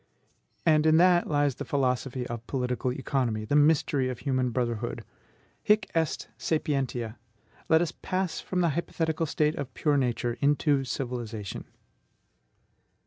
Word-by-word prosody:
And 155 Hz, -1 st, +4 dB
in 155 Hz, 0 st, +6 dB
that 175 Hz, 0 st, +5 dB
lies 145 Hz, -2 st, +2 dB
the -, -, -6 dB
philosophy 130 Hz, -2 st, -1 dB
of 120 Hz, -1 st, -6 dB
political 125 Hz, -1 st, -1 dB
economy, 125 Hz, -5 st, -1 dB
the 145 Hz, -, 0 dB
mystery 145 Hz, -3 st, +3 dB
of 125 Hz, -, -4 dB
human 130 Hz, -2 st, 0 dB
brotherhood. 120 Hz, -1 st, -2 dB, 0.6 s
Hic 210 Hz, -1 st, +2 dB
est 165 Hz, -2 st, -1 dB
sapientia. 130 Hz, -7 st, -1 dB, 0.5 s
Let 160 Hz, +1 st, +5 dB
us 170 Hz, -, -3 dB
pass 185 Hz, -2 st, -1 dB
from 180 Hz, -1 st, -1 dB
the 170 Hz, -, +3 dB
hypothetical 160 Hz, 0 st, -1 dB
state 150 Hz, +1 st, +1 dB
of 140 Hz, -4 st, -5 dB
pure 150 Hz, -2 st, +2 dB
Nature 120 Hz, -2 st, -1 dB
into 145 Hz, -1 st, +3 dB
civilization. 120 Hz, -5 st, -4 dB
140 Hz, 135 wpm, -28 LUFS, 125-160 Hz, 0.6 s, in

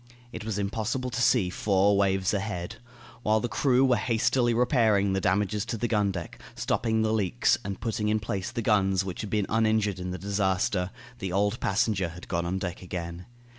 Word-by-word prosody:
It -, -, -6 dB
was 110 Hz, -2 st, -3 dB
impossible 110 Hz, +5 st, -2 dB
to 120 Hz, 0 st, -2 dB
see 105 Hz, -8 st, +3 dB
four 100 Hz, +1 st, +2 dB
waves 95 Hz, -1 st, +2 dB
ahead. 95 Hz, -4 st, -3 dB, 0.4 s
While 110 Hz, -1 st, +2 dB
the 120 Hz, -, -2 dB
crew 130 Hz, +1 st, +3 dB
were 125 Hz, -2 st, +3 dB
hastily 120 Hz, +2 st, +1 dB
repairing 115 Hz, -5 st, +3 dB
the 95 Hz, -, 0 dB
damages 100 Hz, +2 st, +1 dB
to 115 Hz, -, -2 dB
the 120 Hz, -, -1 dB
gun 105 Hz, -3 st, +2 dB
deck, 85 Hz, -3 st, -7 dB
stopping 110 Hz, -1 st, 0 dB
the 110 Hz, 0 st, +1 dB
leaks, 95 Hz, -, +2 dB
and 100 Hz, -1 st, -5 dB
putting 110 Hz, -2 st, -1 dB
in 110 Hz, 0 st, +2 dB
place 100 Hz, -1 st, -3 dB
the 120 Hz, -1 st, -3 dB
guns 95 Hz, -3 st, +2 dB
which 95 Hz, -2 st, -5 dB
had 105 Hz, -, -5 dB
been 105 Hz, -1 st, 0 dB
uninjured 110 Hz, -3 st, +1 dB
in 90 Hz, 0 st, -4 dB
the 90 Hz, -, -4 dB
disaster, 95 Hz, -1 st, 0 dB, 0.3 s
the 95 Hz, -4 st, -3 dB
old 100 Hz, +4 st, +1 dB
passenger 95 Hz, -3 st, +1 dB
had 85 Hz, +2 st, -11 dB
gone 85 Hz, 0 st, -1 dB
on 95 Hz, +2 st, -1 dB
deck 90 Hz, -2 st, -4 dB
again. 85 Hz, -1 st, -6 dB
100 Hz, 195 wpm, -27 LUFS, 95-110 Hz, 0.4 s, see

